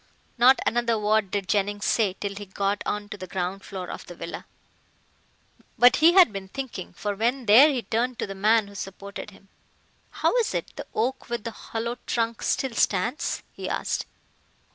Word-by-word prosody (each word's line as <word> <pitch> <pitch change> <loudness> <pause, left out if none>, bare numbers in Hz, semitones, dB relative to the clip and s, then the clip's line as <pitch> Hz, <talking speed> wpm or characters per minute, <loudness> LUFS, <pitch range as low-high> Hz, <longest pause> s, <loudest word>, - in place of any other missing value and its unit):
Not 255 +2 +6
another 235 -1 +1
word 210 -1 +1
did 200 -1 -2
Jennings 205 0 0
say 210 -5 +2
till 200 +1 -5
he 205 0 -8
got 200 +1 -1
on 205 0 -2
to 205 - -7
the 185 - -7
ground 185 +2 -3
floor 185 -2 -6
of - - -8
the 175 - -9
villa. 170 0 -7 1.3
But 245 +1 +6
he 330 +3 +6
had 360 - +7
been 195 -1 -6
thinking, 250 -4 -6
for 205 -1 -3
when 240 +5 -1
there 235 +9 +8
he 250 -4 -2
turned 235 +4 -1
to - - -2
the 195 - -6
man 215 +2 +3
who 200 - -13
supported 200 +1 -7
him. 195 -1 -19 0.6
"How - - 0
is 465 -3 +1
it - - -4
the - - -7
oak 250 +4 -1
with 235 -2 -3
the 230 - -4
hollow 230 +2 -5
trunk 230 -1 -1
still 265 -3 0
stands?" 240 - 0
he - - -6
asked. - - -2
215 Hz, 185 wpm, -25 LUFS, 195-240 Hz, 1.3 s, there